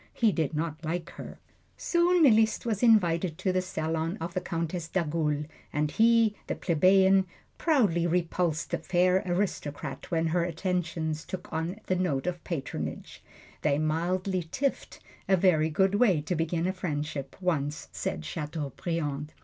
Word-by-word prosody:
He 225 -3 +3
did 160 -4 -1
not 160 0 -3
like 170 +2 -3
her. - - -9 0.4
Soon 345 0 +3
Liszt 220 -5 +4
was 220 -4 -1
invited 180 -8 +3
to 190 - 0
the 185 - +2
salon 165 0 -2
of 170 +1 -5
the 185 - -1
Countess 170 -1 -3
d'Agoult, 155 -4 -1 0.3
and 150 0 0
he, 230 -1 +4
the - - -2
plebeian, 190 +3 +4 0.3
proudly 205 - +2
repulsed 170 -2 0
the - - 0
fair 180 +2 +2
aristocrat 160 -7 -3
when 165 -1 +1
her 170 +1 +1
attentions 165 -2 -2
took 185 - -7
on 165 +6 -2
the 185 - 0
note 175 -7 0
of 175 -2 -3
patronage. 155 -7 -5 0.4
They 140 - +2
mildly 175 +3 -1
tiffed 275 0 -2 0.3
a 190 - +5
very 160 -4 +3
good 190 +5 +2
way 205 -6 +4
to 155 - -2
begin 165 +1 -1
a 185 - 0
friendship, 150 -6 -4
once 155 -5 -1
said 75 - -4
Chateaubriand. 150 - -4
170 Hz, 150 wpm, -28 LUFS, 155-190 Hz, 0.4 s, a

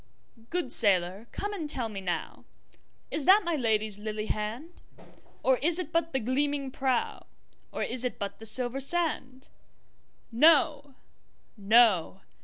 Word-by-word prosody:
Good 345 -7 -1
sailor 190 +1 +4
come 410 +1 -5
and 325 -7 -6
tell 250 -5 -2
me 205 -3 -8
nowIs 190 - -7
that 395 +4 +5
my 340 -2 -2
Lady's 215 -5 0
lily 215 0 -5
hand? 225 +12 -6 0.6
Or 260 -1 +2
is 330 +3 +4
it 350 -3 -5
but 330 0 -1
the 265 - -1
gleaming 275 +3 -2
prow, 260 -2 -3 0.4
Or - - -4
is 250 0 +1
it 250 - -3
but 200 -1 -6
the 225 - -5
silver 250 +3 0
sand? 275 -3 -2 0.8
No! 285 +1 +2 0.6
no! 205 -4 +2
255 Hz, 135 wpm, -27 LUFS, 215-300 Hz, 0.8 s, that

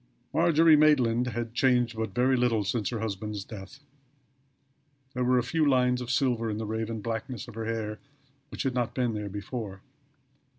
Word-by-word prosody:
Margery 165 -1 +5
Maitland 125 -6 +4
had 120 -1 -4
changed 125 -2 +2
but 110 -3 -4
very 130 +2 +3
little 120 -4 +2
since 105 +1 -1
her 115 -3 -4
husband's 105 -1 -4
death. 110 +5 -10 1.3
There 125 - -1
were 125 +1 +3
a 125 - +2
few 160 +6 0
lines 125 -3 +3
of 120 - -6
silver 120 -3 +1
in 105 - -2
the 110 - -3
raven 110 0 -3
blackness 115 +3 -4
of 120 - -10
her 115 +1 -5
hair 110 -1 -3 0.5
which - - -4
had 135 - 0
not 120 -2 -1
been 125 -3 0
there 105 -1 -4
before. 100 -1 -6
115 Hz, 175 wpm, -28 LUFS, 110-125 Hz, 1.3 s, Margery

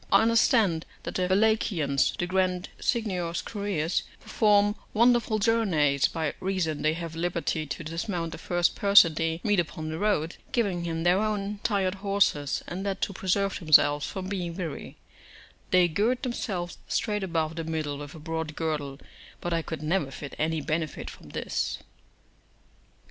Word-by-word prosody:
I - - +6
understand 225 -7 +3 0.2
that - - -5
the 180 -1 0
Wallachians, 185 -8 +2
the 175 - -1
grand 185 0 0
Signior's 185 -8 -1
couriers, 200 -6 -1 0.2
perform 205 -1 +3 0.2
wonderful 235 -1 +4
journeys, 185 -11 +2
by 160 -3 -2
reason 185 -5 -1
they 155 +1 +2
have 165 -1 -6
liberty 165 -2 -1
to 165 - -5
dismount 165 +1 -3
the - - -8
first 175 0 +1
person 200 -5 +6
they 165 +1 -1
meet 205 -3 +2
upon 155 -2 -3
the 160 +1 -4
road, 180 -6 0 0.2
giving 195 -9 0
him 165 -1 -2
their 175 +2 +4
own 210 -1 -2
tired 195 -4 +1
horses; 195 -8 +1
and 185 +2 -5
that 195 -1 -2
to 200 - -1
preserve 195 +1 0
themselves 145 -3 +5
from 190 -1 -5
being 180 -4 -3
weary, 165 -6 -6 0.7
they 180 -1 +5
gird 220 +9 0
themselves 190 -8 -3
straight 210 -2 -1
about 165 -3 -1
the 165 - -3
middle 155 -3 -3
with 145 +1 -8
a - - -9
broad 160 -1 -4
girdle; 145 -4 -3 0.4
but 175 - -2
I 165 - +1
could 160 -2 -6
never 155 -2 0
find 140 +1 -8
any 160 0 0
benefit 155 0 -3
from - - -14
this. - - -2
175 Hz, 160 wpm, -27 LUFS, 160-200 Hz, 0.7 s, I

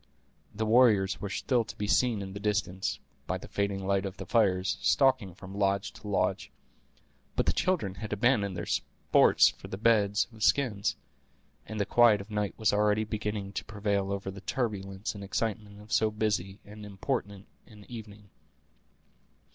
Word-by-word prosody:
The 110 +2 -3
warriors 105 -7 +4
were 100 - -3
still 120 +5 +1
to - - -10
be 105 - -3
seen 110 -1 +2
in 95 -1 -7
the 100 - -6
distance, 100 -2 -1 0.3
by - - -1
the - - -11
fading 100 -1 -2
light 100 0 +1
of 95 -1 -5
the - - -7
fires, 95 -5 +2
stalking 130 -10 +2
from 95 0 -10
lodge 100 0 0
to 105 - -11
lodge. 95 -1 0 0.9
But - - +1
the - - +2
children 170 - 0
had 105 +3 -7
abandoned 105 -3 +1
their 85 - -4
sports - - +3
for - - -11
their 95 - -6
beds 105 -1 +3
of 110 - -14
skins, 110 -4 +2 0.7
and 110 -1 -5
the 100 - +1
quiet 120 -2 +5
of 100 +2 -10
night 105 -1 -2
was 110 -2 +2
already 105 +1 +2
beginning 105 -2 -4
to - - -4
prevail 100 -2 -1
over 100 -1 -3
the 100 0 -10
turbulence 100 -5 -3
and 100 -1 -8
excitement 105 0 -3
of 105 +3 -8
so 110 -1 +3
busy 105 -3 -1
and 105 +1 -11
important 100 -1 -4 0.2
an 105 -2 -15
evening. 105 -4 -10
105 Hz, 170 wpm, -29 LUFS, 100-110 Hz, 0.9 s, quiet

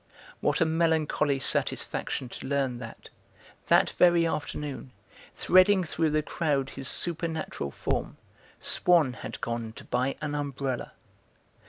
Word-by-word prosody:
What - - 0
a - - +6
melancholy 160 -3 +1
satisfaction 135 -1 0
to 130 - -8
learn 135 -3 0
that, 115 -2 -10 0.6
that - - +4
very 175 -1 +4
afternoon, 145 -4 -4 0.4
threading 185 +1 +5
through 160 -1 0
the 155 0 +1
crowd 145 -5 -1
his 135 -1 -6
supernatural 165 - -2
form, - - -3 0.4
Swann 165 -8 +3
had - - -7
gone 115 -1 -3
to - - -11
buy 130 +2 0
an 150 -1 -3
umbrella. 140 -3 -3
145 Hz, 125 wpm, -28 LUFS, 130-165 Hz, 0.6 s, a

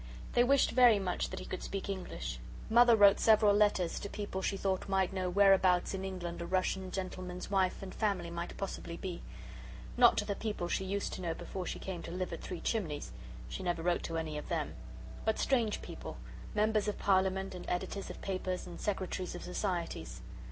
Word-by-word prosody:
They 240 - +5
wished 275 +2 +4
very 245 -3 +7
much 185 -3 -1
that - - -6
he - - -7
could 185 - -5
speak 195 0 -4
English. - - -4 0.3
Mother 240 0 +7
wrote 200 -2 +7
several 215 -2 +6
letters 205 -4 +2
to 200 - -5
people 200 -2 -4
she 195 - -1
thought 190 0 -1
might 190 -1 +2
know 185 -1 -1
whereabouts 190 -2 +4
in 190 0 -3
England 175 -3 -4
a 170 - -4
Russian 185 +1 0
gentleman's 185 -1 -5
wife 190 -1 +1
and 190 - -7
family 200 -6 -1
might 170 0 -5
possibly 180 -3 -5
be; 180 -3 -5 0.8
not - - +7
to - - +1
the 200 - -1
people 205 -4 -3
she 190 - -1
used 200 +1 -2
to - - -5
know 165 -2 -2
before 185 +1 -5
she - - -3
came 185 -3 -5
to - - -7
live 185 +1 -3
at - - -6
Three 180 - -6
Chimneys 165 -10 -2 0.4
she - - -5
never 175 -2 -1
wrote 175 0 +2
to 165 - -3
any 155 -2 -3
of - - -10
them - - -1 0.5
but 220 0 +1
strange 235 -6 +1
people - - -7 0.4
Members 215 0 +2
of 210 - -1
Parliament 190 0 +2
and 180 - -7
Editors 195 +2 -3
of - - -8
papers, 185 -1 -2
and 175 - -9
Secretaries 185 -3 -2
of 175 - -7
Societies. 175 - -3
190 Hz, 200 wpm, -33 LUFS, 180-200 Hz, 0.8 s, very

